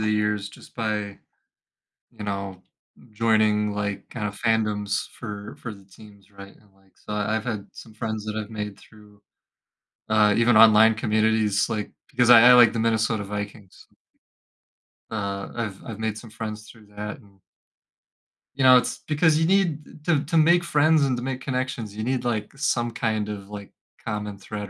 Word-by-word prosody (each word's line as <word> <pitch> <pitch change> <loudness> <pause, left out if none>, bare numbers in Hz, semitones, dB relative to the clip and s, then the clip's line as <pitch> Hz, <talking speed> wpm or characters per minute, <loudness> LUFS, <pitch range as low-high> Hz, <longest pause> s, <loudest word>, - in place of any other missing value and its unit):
the 110 - 0
years 105 -1 0
just - - -16
by, 105 -3 -3 0.9
you 105 - -9
know, 100 -2 -5 0.5
joining, 105 -1 +2
like, 100 -1 -4
kind 105 -3 -4
of 105 0 -7
fandoms 105 -3 0
for 105 -3 -8
for 115 -3 -7
the 100 -1 -17
teams, 100 +1 -17
right, 100 0 -13
and, 105 -2 -26
like, 95 -1 -30
so 105 - -9
I've 105 +1 -1
had 110 -5 -4
some 110 - -13
friends 110 -1 -4
that 110 0 -5
I've 110 0 -5
made 105 -2 -6
through, 105 -2 -19 0.9
uh, 105 -1 +4
even 120 -1 +4
online 110 0 +7
communities, 110 -1 +1
like, 105 -2 -3 0.2
because 125 -3 +2
I 120 +1 +9
I - - +9
like 120 -2 +7
the 115 - -2
Minnesota 110 -1 +1
Vikings. 105 -1 -8 1.2
Uh, 100 -2 -4
I've 110 -5 -5
I've 110 -2 -7
made 110 -1 -2
some 115 0 -11
friends 110 -1 -7
through 110 -2 -17
that 105 +1 -6
and 100 -2 -22 1.2
you 135 - -1
know, 130 -1 +8
it's - - -1
because 155 +1 +3
you 160 - +2
need 165 -6 0
to 155 -4 +2
to 165 +3 0
make 170 +3 +5
friends 155 -1 +3
and 130 -2 0
to 120 - -5
make 130 -1 -4
connections, 125 -5 -3
you 110 - -4
need, 125 +1 -1
like, 110 -3 -2
some 120 -4 0
kind 110 -2 -2
of, 100 -1 -7
like, 100 -1 -9 0.3
common 105 -1 -4
thread, 105 0 -7
110 Hz, 175 wpm, -24 LUFS, 105-120 Hz, 1.2 s, I